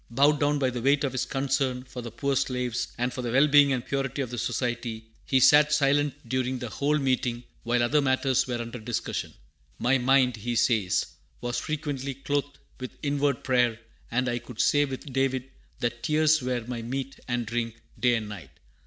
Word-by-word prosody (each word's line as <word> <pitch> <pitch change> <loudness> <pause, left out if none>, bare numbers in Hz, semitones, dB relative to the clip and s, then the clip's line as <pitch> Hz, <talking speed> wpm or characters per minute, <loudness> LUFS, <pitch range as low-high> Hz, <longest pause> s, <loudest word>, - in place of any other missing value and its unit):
Bowed 140 +5 +3
down 145 0 +2
by 130 -2 +1
the 120 -1 -4
weight 140 +3 +3
of 135 - 0
his 130 - -1
concern 135 -2 -1
for 130 -1 -8
the 115 - -6
poor 140 +4 -1
slaves 125 -3 -1
and 125 +1 -1
for 125 - -4
the 120 -2 -3
well 135 +4 +5
being 145 -1 +6
and 125 -2 -1
purity 135 0 -2
of 125 - -7
the 120 - -4
Society, 120 -1 -2 0.2
he 130 - +3
sat 150 +3 +6
silent 145 -2 +1
during 130 +1 -1
the 120 -2 -5
whole 150 +2 +1
meeting, 125 -3 0 0.2
while 120 0 +1
other 145 +5 +3
matters 130 -1 +2
were 120 -1 -2
under 115 +1 -6
discussion. 115 +1 -3 0.5
"My 130 +2 +2
mind," 125 -1 +3
he 120 +3 -3
says, 110 -5 +2 0.3
"was 120 0 -2
frequently 145 -3 -3
clothed 145 +1 -2 0.2
with 130 -1 -7
inward 140 -2 0
prayer; 125 -3 +2 0.3
and 125 +2 0
I 120 0 -1
could 120 -2 -12
say 145 0 +4
with 135 0 -7
David 135 0 0 0.3
that 120 0 -2
'tears 155 +2 +3
were 125 -2 -2
my 120 -1 -4
meat 135 +3 -5
and 120 -1 -1
drink, 115 0 -3 0.2
day 120 -1 +3
and 110 -2 -3
night.' 105 -5 -9
130 Hz, 195 wpm, -27 LUFS, 120-140 Hz, 0.5 s, being